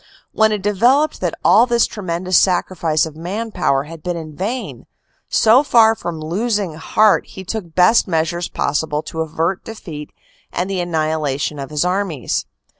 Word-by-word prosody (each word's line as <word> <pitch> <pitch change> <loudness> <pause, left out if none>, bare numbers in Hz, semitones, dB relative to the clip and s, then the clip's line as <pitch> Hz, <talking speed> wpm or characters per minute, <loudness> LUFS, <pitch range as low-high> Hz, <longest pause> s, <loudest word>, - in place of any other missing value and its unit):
When 220 0 +3
it 210 -3 -2
developed 245 +9 +2
that - - -1
all 240 - +6
this 235 -1 +3
tremendous 185 -3 -3
sacrifice 175 -4 +2
of 155 -2 -9
man 200 +8 -4
power 140 -8 +1
had 160 +2 -11
been 175 0 -3
in 155 -2 -8
vain, 225 - -4 0.4
so 230 +4 +5
far 230 -6 +5
from 175 -6 -6
losing 195 +3 -1
heart 205 +6 +2
he 190 - -10
took 180 -4 -6
best 185 +6 +4
measures 170 0 -1
possible 150 +1 -1
to 160 - -5
avert 165 +4 -2
defeat 165 -9 -8 0.4
and 180 - -2
the 195 -2 -2
annihilation 155 -4 -1
of 135 - -6
his 150 +2 -1
armies. 180 - -1
175 Hz, 160 wpm, -19 LUFS, 160-210 Hz, 0.4 s, all